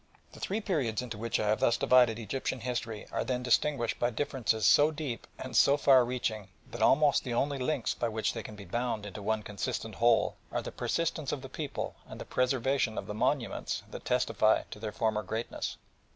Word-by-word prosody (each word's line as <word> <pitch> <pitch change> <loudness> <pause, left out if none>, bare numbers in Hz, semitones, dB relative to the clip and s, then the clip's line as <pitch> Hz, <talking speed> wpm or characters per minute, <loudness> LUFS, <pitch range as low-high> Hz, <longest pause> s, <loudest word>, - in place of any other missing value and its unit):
The - - -12
three 210 +4 -2
periods 130 - -1
into 115 -4 -6
which 115 +1 -1
I 105 - 0
have 110 - +2
thus 120 - +3
divided 125 -3 +5
Egyptian 120 +3 -3
history 115 -3 -3
are - - -1
then 125 -1 -2
distinguished 125 -1 +1
by 120 - +2
differences 120 -3 0
so 145 +1 +6
deep 150 -6 -5
and - - -7
so 140 - +6
far 135 -3 +6
reaching 120 -4 -2 0.2
that 120 - -6
almost 145 +5 +4
the 120 -3 -3
only 140 +2 0
links 125 -4 0
by 120 - -2
which 110 0 -1
they 115 - -4
can 105 - -9
be 100 -1 -10
bound 120 -3 -2
into 105 +1 -7
one 110 +1 -1
consistent 105 +2 -4
whole 115 +2 +3
are - - -2
the - - -6
persistence 160 -3 -1
of 140 -2 -4
the 135 - -8
people 145 +1 -4
and - - -9
the - - -6
preservation 125 -2 +1
of - - -3
the - - -5
monuments 120 +3 -1
that - - -7
testify - - +2
to - - -8
their 110 -1 -4
former 110 0 0
greatness. 110 +2 -4
120 Hz, 205 wpm, -30 LUFS, 110-135 Hz, 0.2 s, so